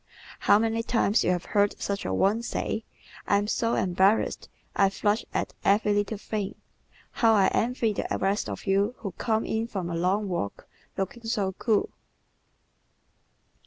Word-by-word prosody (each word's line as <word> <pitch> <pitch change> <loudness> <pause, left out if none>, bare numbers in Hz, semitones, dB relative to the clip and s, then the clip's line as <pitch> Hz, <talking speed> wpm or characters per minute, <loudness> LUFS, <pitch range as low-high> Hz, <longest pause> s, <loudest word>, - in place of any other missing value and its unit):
How - - +5
many 225 +1 0
times 230 -2 +2
you - - +1
have 180 -1 0
heard 205 0 +1
such 200 0 -3
a 95 - -1
one 200 - +2
say: 225 -1 -3 0.4
"I 200 - +4
am 205 - 0
so 230 +2 0
embarrassed! 190 +4 +1 0.3
I 195 -1 +4
flush 205 +2 0
at - - -2
every 205 +1 +3
little 205 +1 0
thing! 205 -1 -4 0.6
How 225 -2 +3
I 195 -2 +4
envy 230 -2 +1
the - - -3
rest 195 +2 0
of - - -6
you 200 +4 +1
who 200 - -5
come 220 +5 -1
in 225 +1 -1
from 185 -6 -4
a - - -2
long 190 +5 +1
walk 170 - -4 0.3
looking 195 +5 -4
so 210 -4 0
cool!" 210 +2 0
205 Hz, 160 wpm, -27 LUFS, 195-225 Hz, 0.6 s, How